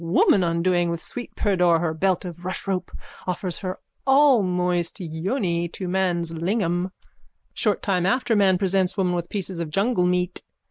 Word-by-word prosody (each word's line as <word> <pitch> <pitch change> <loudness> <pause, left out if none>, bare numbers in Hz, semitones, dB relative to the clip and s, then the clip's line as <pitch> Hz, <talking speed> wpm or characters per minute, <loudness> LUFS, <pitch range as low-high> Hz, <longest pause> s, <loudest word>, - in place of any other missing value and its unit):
_ - - -9
Woman, 180 +3 +4
undoing 175 +1 +1
with 170 0 -2
sweet 245 +7 -8
pudor 180 -5 +3
her 160 -1 -1
belt 185 +3 0
of 175 -2 -6
rushrope, 185 0 -3 0.4
offers 180 0 -2
her 185 -1 -4 0.3
allmoist 185 - +3
yoni 170 - -1
to 185 +2 -6
man's 175 -2 0
lingam. 175 +1 -1 0.6
Short 210 -3 0
time 185 -3 +1
after 245 0 +1
man 195 -3 +4
presents 190 0 +1
woman 180 -2 +1
with 175 -1 -3
pieces 190 -3 -4
of 165 -2 -3
jungle 195 +2 +1
meat. 180 0 0
180 Hz, 155 wpm, -24 LUFS, 175-195 Hz, 0.6 s, Woman